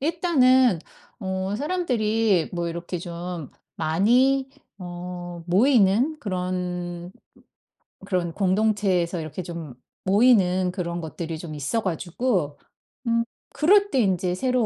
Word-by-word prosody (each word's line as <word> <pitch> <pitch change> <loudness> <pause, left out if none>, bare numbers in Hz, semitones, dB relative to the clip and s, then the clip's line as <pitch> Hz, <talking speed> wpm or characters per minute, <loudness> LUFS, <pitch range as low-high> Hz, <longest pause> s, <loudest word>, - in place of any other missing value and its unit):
일단은 260 - +3 0.4
어 190 0 -2
사람들이 225 - +1
뭐 175 -1 -2
이렇게 170 +1 -5
좀 170 -3 -6 0.3
많이 245 +12 +3 0.3
어 175 -1 -7
모이는 230 - +4
그런 180 -3 -4 0.9
그런 180 -3 -1
공동체에서 190 -2 +1
이렇게 160 +3 -5
좀 165 -6 -7 0.3
모이는 190 -4 +4
그런 175 -2 -3
것들이 160 0 -5
좀 155 -1 -7
있어 150 +11 -1
가지고 180 - -1 0.5
음 230 0 +2 0.3
그럴 405 +6 +4
때 265 - +2
인제 185 -3 +1
새로 250 +2 +1
185 Hz, 220 characters per minute, -24 LUFS, 175-235 Hz, 0.9 s, 모이는